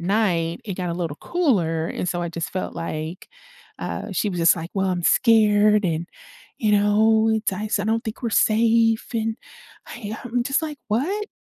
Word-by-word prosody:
night 175 -1 0
it 195 -4 -4
got 180 -1 -3
a - - -2
little 165 -4 -3
cooler, 180 - 0
and 180 - -3
so 175 - -2
I 170 - -2
just 165 -1 -5
felt 185 - -4
like, 165 +1 -5 0.5
uh, - - -5
she 210 - 0
was 175 - -4
just 165 +1 +5
like, 165 +1 -6
"Well, 195 -1 0
I'm 180 -1 -2
scared, 210 -1 +4
and 170 0 -1 0.5
you 215 -2 +1
know, 220 +2 +4
it's 220 -2 0
I 200 +3 -4
s 215 - 0
I - - -2
don't 225 +1 0
think 220 +2 -6
we're 230 - 0
safe," 225 +1 +3
and 225 -1 -1 0.5
I 220 -2 -7
am 245 0 -1
just 275 +5 0
like, 300 -2 -5
"What?" 360 - -1
210 Hz, 195 wpm, -23 LUFS, 175-225 Hz, 0.5 s, just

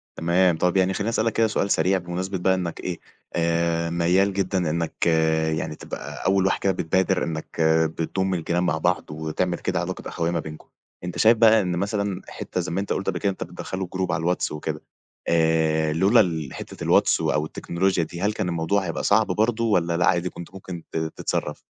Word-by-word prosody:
تمام. 85 0 +2
طَب 90 +2 +1
يعني 95 0 +3
خلّيني 105 +4 -1
أسألك 115 0 0
كده 115 -1 +3
سؤال 100 -2 -1
سريع 95 +1 +3
بمناسبة 90 +2 -4
بقى 95 +1 +2
إنك 90 -3 -4
إيه، 90 -2 -4 0.4
آآ 85 0 +1
ميَّال 90 +4 +2
جدًا 95 0 0
إنك 85 +1 -2
آآ 80 -1 +2
يعني 80 - -3
تبقى - - -8
أول 95 0 +3
واحد 95 - +1
كده 95 - +2
بتبادر 95 +2 +1
إنك 80 0 -4 0.4
بتضُم 95 +3 -1
الجيران 85 +1 0
مع 85 -4 +1
بعض 90 -1 0
وتعمل 80 +3 -2
كده - - -1
علاقة - - -4
أخوية 85 0 -1
ما 85 - 0
بينكم. 75 0 -9 0.4
أنت 90 -1 -5
شايف 115 +1 +5
بقى 110 -1 +6
إن 90 -2 -1
مثلًا 100 0 -2
حتّة - - -5
زَي - - -5
ما 90 - -1
أنت 100 - -2
قُلت 95 - -4
قبل - - -1
كده 100 - +1
أنت 95 - -5
بتدخّله 95 0 -5
group 95 0 -1
على - - -1
الواتس 90 +2 0
وكده، 75 - -4 0.5
آآ 80 -1 +2
لولا 95 +8 +4
ال 80 -8 0
حتة - - -8
الواتس - - +3
أو 75 0 +1
التكنولوجيا 85 +2 -1
دي 85 +3 -7
هل 105 +1 +1
كان 90 - -2
الموضوع 85 +4 0
هيبقى 85 -2 -3
صعب 110 +2 +3
برضه، 110 +4 +1
والّا 85 -6 +1
لا 90 - +2
عادي 90 0 +2
كنت 85 +1 -10
ممكن 95 -3 -8
ت - - -3
تتصرّف؟ 80 -1 -3
90 Hz, 200 wpm, -24 LUFS, 85-95 Hz, 0.5 s, بقى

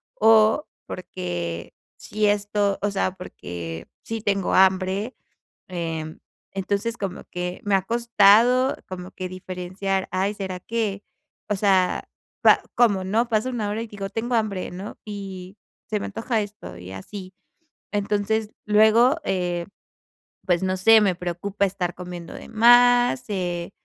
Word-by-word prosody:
o 220 - +5 0.2
porque 85 - -5 0.2
si 215 0 -1
esto 205 -1 +1
o 205 - 0
sea, 195 -1 0
porque 85 - -7 0.2
sí 225 -1 -4
tengo 200 -3 0
hambre. 190 +4 +3 0.5
Em, 165 -3 -4 0.3
entonces, 200 +4 -2
como 195 -3 -4
que 180 0 -4
me 205 -1 +3
ha 190 - 0
costado, 235 +3 +4
como 180 -1 -7
que 185 0 -5
diferenciar: 185 +1 -3
"Ay, 195 +3 0
será 190 -2 -5
que", 210 -3 -2 0.4
o 210 - +1
sea, 190 -2 +2 0.3
pa - - +6
como, 205 -6 +3
¿no?, 225 +5 +1
pasa 220 +2 +1
1 225 -5 -2
hora, 215 - -2
y - - -5
digo: 200 -2 -6
"Tengo 240 +2 -2
hambre", 210 -4 -1
¿no? 190 +4 -8
Y: 195 -2 -7 0.3
"Se 210 - +1
me - - -3
antoja 225 +2 -1
esto", 205 - -9
y 90 +1 -9
así. 185 - -9 0.6
Entonces, 210 +1 0 0.2
luego, 220 +7 +5
eh, 175 -2 -1 0.8
pues 175 0 +2
no 185 0 0
sé, 225 +4 +7
me 190 -4 +2
preocupa 185 +3 -2
estar 180 -2 -3
comiendo 175 -2 -8
de - - -10
más, 245 +2 +5
eh, 175 -2 -3
200 Hz, 140 wpm, -24 LUFS, 185-215 Hz, 0.8 s, sé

